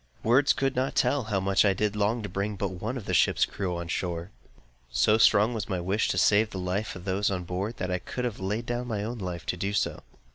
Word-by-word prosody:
Words 130 +5 +4
could 135 -1 -1
not 130 +2 -1
tell 140 -5 +2
how 105 -3 0
much 95 +1 +3
I 100 -2 +4
did 105 +1 0
long 105 +3 0
to - - -3
bring 100 +2 -3
but 100 0 -2
one 105 +8 -4
of 110 - -7
the - - -3
ship's - - +4
crew 90 -3 -3
to 85 - -3
the - - -10
shore! 85 +1 -3 0.6
So 105 - +3
strong 110 +1 +5
was 110 -4 -4
my 95 - -1
wish 95 +5 0
to - - 0
save 105 +4 +4
the 95 - -7
life 95 +4 -2
of 90 - -10
those 100 +1 +1
on 90 -2 -2
board, 95 +6 -4
that 90 -1 -3
I 90 - 0
could 125 +7 -4
have 120 -4 -3
laid 105 +5 -2
down 120 0 -3
my 105 -4 -2
own 115 +2 -4
life 90 -4 -5
to 90 - -2
do 100 +2 -2
so. - - -1
100 Hz, 260 wpm, -27 LUFS, 90-110 Hz, 0.6 s, strong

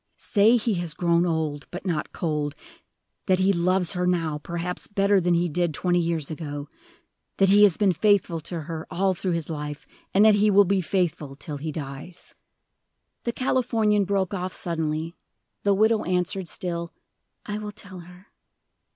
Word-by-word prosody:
"Say 220 +2 +4
he 225 -1 0
has 165 -3 -4
grown 170 0 +2
old, 155 -3 -2
but 180 - -8
not 165 -5 -2
cold; 150 -3 -2 0.7
that 185 -1 +4
he 190 +2 +3
loves 180 0 +1
her 180 -1 0
now 165 -4 0
perhaps 170 +3 -4
better 200 -1 +2
than 175 0 +2
he 175 +1 +2
did 170 -1 -1
twenty 175 +2 +1
years 165 -3 -1
ago; 145 -2 -5 0.7
that 195 -1 +4
he 205 +1 +6
has 200 -5 +6
been 200 -3 +3
faithful 200 -3 +2
to 165 +1 -5
her 160 +1 -6
all 190 +1 +1
through 185 0 -2
his 165 -2 -2
life, 150 -1 -5 0.3
and 200 +2 +5
that 215 - +7
he 205 +1 +4
will 205 0 +6
be 195 +1 +1
faithful 160 -6 -1
till 145 +1 -7
he 155 +2 -4
dies." 145 +4 -8 0.9
The 235 - +1
Californian 230 -5 +1
broke 195 -1 0
off 185 -1 -3
suddenly. 160 -1 -2 0.5
The 200 -1 +3
widow 220 +2 +3
answered 180 +1 -1
still, 170 -1 -3 0.5
"I 210 0 -4
will 210 -1 -5
tell 190 -3 -9
her." 180 +2 -14
180 Hz, 170 wpm, -25 LUFS, 160-200 Hz, 0.9 s, that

